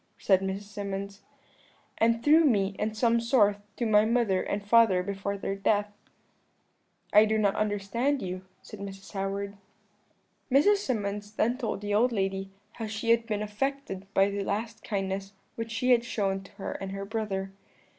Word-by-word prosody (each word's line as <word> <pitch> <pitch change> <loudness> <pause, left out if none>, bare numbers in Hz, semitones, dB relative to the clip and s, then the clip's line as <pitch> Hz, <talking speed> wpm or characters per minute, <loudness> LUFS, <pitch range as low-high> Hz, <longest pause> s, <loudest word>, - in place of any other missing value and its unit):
said 190 -2 +3
Mrs. 195 +1 -3
Symonds, 200 -1 -6 0.8
'and 230 +1 +2
through 315 +3 +6
me, 200 -8 +2
in 215 +1 -1
some 235 +1 +3
sort, 220 -4 +3 0.2
to 240 - -1
my 210 -1 +5
mother 220 -4 +2
and 200 0 -3
father 205 -4 +5
before 200 +1 -3
their 195 0 -3
death.' 205 +1 +1 1.2
"'I 210 +1 +8
do 220 0 +1
not 205 -2 +2
understand 215 +7 0
you,' 185 -3 -4 0.2
said 215 - -10
Mrs. 195 -1 -8
Howard. 200 0 -3 0.9
"Mrs. 350 +11 +5
Symonds 210 - -3
then 235 +3 +1
told 225 -6 -3
the 205 0 -2
old 240 +4 +3
lady 195 -2 -1 0.2
how 225 - -6
she 220 +2 -1
had 230 0 +3
been 210 -2 -1
affected 210 -3 -4
by 195 +1 +4
the 200 0 -2
last 220 +3 -3
kindness 195 -1 -3 0.2
which 230 0 -5
she 230 +3 +1
had 235 -1 +5
shown 195 -5 -1
to 195 - -15
her 200 -1 -5
and 195 0 -5
her 195 0 -4
brother. 200 -3 -3
205 Hz, 165 wpm, -28 LUFS, 195-230 Hz, 1.2 s, I